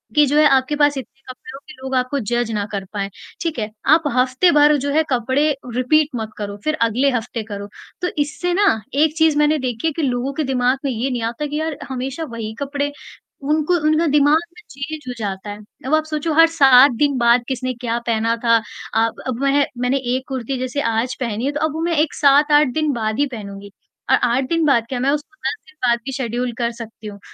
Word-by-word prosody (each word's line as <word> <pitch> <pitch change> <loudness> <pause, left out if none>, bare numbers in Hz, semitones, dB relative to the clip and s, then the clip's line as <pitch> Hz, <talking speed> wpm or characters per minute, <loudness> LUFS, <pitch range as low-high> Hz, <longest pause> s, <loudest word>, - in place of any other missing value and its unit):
कि 300 - +6
जो 290 +2 +1
है 305 - +6
आपके 265 +2 +2
पास 290 -1 +3
इतने 270 +1 -9
कपड़े 255 0 -10
हो - - -9
के 305 - -11
लोग 265 0 -5
आपको 255 +2 0
जज 240 0 -1
ना 210 -2 -1
कर 195 -2 -4
पाएँ, 200 -1 -2 0.3
ठीक 325 -6 -2
है? 215 -1 -3 0.2
आप 315 +1 +5
हफ्ते 255 +8 +3
भर 295 0 +5
जो 285 +1 -3
है 315 +1 +3
कपड़े 260 +4 +1 0.3
रिपीट 295 +4 +3
मत 220 -2 -4
करो 205 -1 -5
फिर 310 0 0
अगले 235 +5 +2
हफ्ते 235 -1 -3
करो। 205 -2 -7 0.3
तो 360 - 0
इससे 295 +5 -2
ना 405 +3 +3 0.3
एक 300 +2 +2
चीज़ 320 -2 +3
मैंने 300 +1 +3
देखी 250 +2 -2
है - - +1
कि 330 - -3
लोगों 260 -1 -1
के 310 - -2
दिमाग 255 -1 +1
में 275 - 0
ये 245 +3 -2
नहीं 245 -2 -2
आता 230 +5 -3
है 295 - -2
कि 300 +1 -2
यार 315 -2 -3
हमेशा 265 +4 -4
वही 220 -1 -5
कपड़े 285 +1 -2 0.6
उनको 310 +3 +1
उनका 310 +2 +3
दिमाग 295 +2 +4
में 355 - -14
चेंज 290 +3 -6
हो 250 - -3
जाता 200 -1 -4
है। 205 - -7 0.3
अब 275 - -2
आप 310 - +1
सोचो 315 +1 -2
हर 330 +2 +7
7 275 -4 +6
दिन 285 -1 +2
बाद 240 0 +4
किसने 255 -1 -2
क्या 235 -1 -3
पहना 230 0 +1
था 230 -1 +5 0.4
अ, 225 +1 +3 0.2
अब 255 0 -3
वह 280 +1 +3
मैंने 250 +2 +1 0.2
एक 260 0 -4
कुर्ती 265 0 -3
जैसे 255 +3 -2
आज 230 +3 -1
पहनी 235 -1 -2
है 280 - +1
तो 295 - -4
अब 315 - -2
वो 320 - -4
मैं 335 -1 0
एक 305 0 +1
7-8 295 +1 +4
दिन 310 -1 0
बाद 220 -1 -2
ही 290 - +4
पहनूँगी 200 -3 -8 0.4
और - - +7
8 245 +2 +2
दिन 330 -1 +1
बाद 255 -6 +3
क्या, 255 - -3
मैं 260 +2 +1
उसको 300 +1 -4
10 - - -1
दिन 310 - -19
बाद 235 0 +3
भी 270 - -4
शेड्यूल 250 -1 -2
कर 235 -2 0
सकती 225 -2 -10
हूँ, 200 -1 -9
265 Hz, 235 wpm, -20 LUFS, 235-295 Hz, 0.6 s, हर